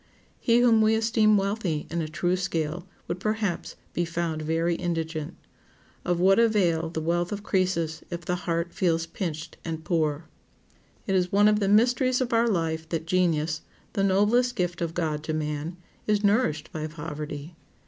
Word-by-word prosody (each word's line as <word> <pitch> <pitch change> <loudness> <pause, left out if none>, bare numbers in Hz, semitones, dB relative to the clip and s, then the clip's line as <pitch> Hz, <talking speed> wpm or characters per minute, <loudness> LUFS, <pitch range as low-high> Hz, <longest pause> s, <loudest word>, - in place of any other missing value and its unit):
He 235 0 +3
whom 230 -2 +5
we 220 0 +4
esteem 220 -1 +3
wealthy 195 -6 -1
in 170 0 -1
a 155 - -2
true 175 +3 0
scale 175 -2 -2 0.2
would 175 - -3
perhaps 215 -3 -2 0.2
be 175 - 0
found 170 -2 -2
very 165 +2 +1
indigent. 165 -2 -3 0.7
Of 175 -1 0
what 195 +4 +5
avail 180 -8 +2
the 160 - -3
wealth 175 +1 0
of 205 0 -4
Crœsus 175 -6 0
if 170 -1 -6
the 180 - 0
heart 170 +1 -1
feels 165 -3 +1
pinched 165 -2 -5
and 160 -1 -5
poor? 155 -2 0 0.8
It 195 - -1
is 180 -1 +2
one 205 +1 +5
of 210 0 +4
the 200 - +1
mysteries 245 +4 +3
of 250 -2 -1
our 230 +1 +4
life 160 -5 -1
that 160 -1 -2
genius, 165 -3 +1 0.3
the 195 - 0
noblest 210 +6 +3
gift 175 -1 -2
of 165 -1 -2
God 155 -3 -1
to 155 - -1
man, 150 +2 -3 0.3
is 210 -1 +2
nourished 200 -8 +1
by 155 -1 -4
poverty. 150 0 -6
175 Hz, 170 wpm, -26 LUFS, 160-205 Hz, 0.8 s, whom